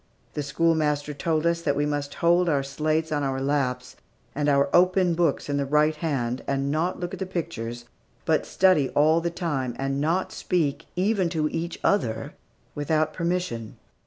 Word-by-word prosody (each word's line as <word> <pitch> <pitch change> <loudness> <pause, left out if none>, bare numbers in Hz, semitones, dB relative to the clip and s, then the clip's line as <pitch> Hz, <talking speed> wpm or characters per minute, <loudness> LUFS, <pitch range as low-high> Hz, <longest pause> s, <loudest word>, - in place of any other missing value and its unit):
The 150 - -2
schoolmaster 150 0 +1
told 155 +2 -1
us 170 0 +1
that 145 -4 0
we 145 - +1
must 145 -1 -3
hold 175 +1 +3
our 140 -3 +1
slates 155 +3 -1
on 150 -1 0
our 135 -1 -1
laps, 135 -2 -1 0.4
and 145 +1 0
our 140 0 +3
open 185 0 +4
books 165 -3 0
in 145 -1 -1
the 140 - 0
right 150 +2 +3
hand, 130 -6 -2
and 140 0 0
not 165 +4 -1
look 175 0 -4
at - - -6
the 190 - -3
pictures, 120 -10 -5 0.4
but - - +1
study 185 -8 +3
all 155 +3 +4
the 170 - -1
time, 145 -8 -2
and 135 +1 -1
not 170 +5 0
speak, 160 -3 -1
even 190 -1 +1
to 160 -3 0
each 165 +2 -4
other, 115 - 0 0.4
without 155 +1 0
permission. 170 -11 -3
150 Hz, 175 wpm, -25 LUFS, 140-170 Hz, 0.4 s, open